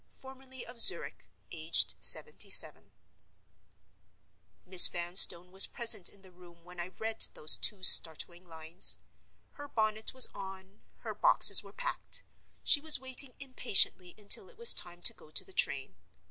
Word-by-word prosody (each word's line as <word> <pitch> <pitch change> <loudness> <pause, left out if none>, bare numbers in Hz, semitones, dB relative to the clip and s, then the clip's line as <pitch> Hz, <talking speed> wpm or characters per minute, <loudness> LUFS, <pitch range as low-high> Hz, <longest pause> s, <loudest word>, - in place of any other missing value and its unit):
formerly 265 -1 -17
of 240 -1 -6
Zurich, - - 0 0.2
aged 160 0 -2
77." 465 - +2 1.7
Miss 180 -1 +7
Vanstone 175 0 -1
was 190 +1 +5
present 230 -7 -1
in 200 - -22
the 190 - -20
room 175 -1 -23
when 180 0 -18
I 175 - -8
read 220 +4 -9
those 155 - +1
two 195 -3 -3
startling 170 +2 +2
lines. 160 +2 -2 0.5
Her 290 - -15
bonnet 220 -3 -6
was 260 -1 +3
on; 190 +1 -14 0.2
her - - -10
boxes - - +1
were - - -19
packed; - - -6 0.4
she 290 - -1
was 310 -2 -1
waiting 260 0 -3
impatiently 195 -8 0
until 205 -1 -3
it 470 - -24
was 470 0 +7
time 175 0 -4
to - - +4
go - - -23
to - - -1
the 385 - -16
train. - - -4
195 Hz, 145 wpm, -27 LUFS, 175-260 Hz, 1.7 s, Miss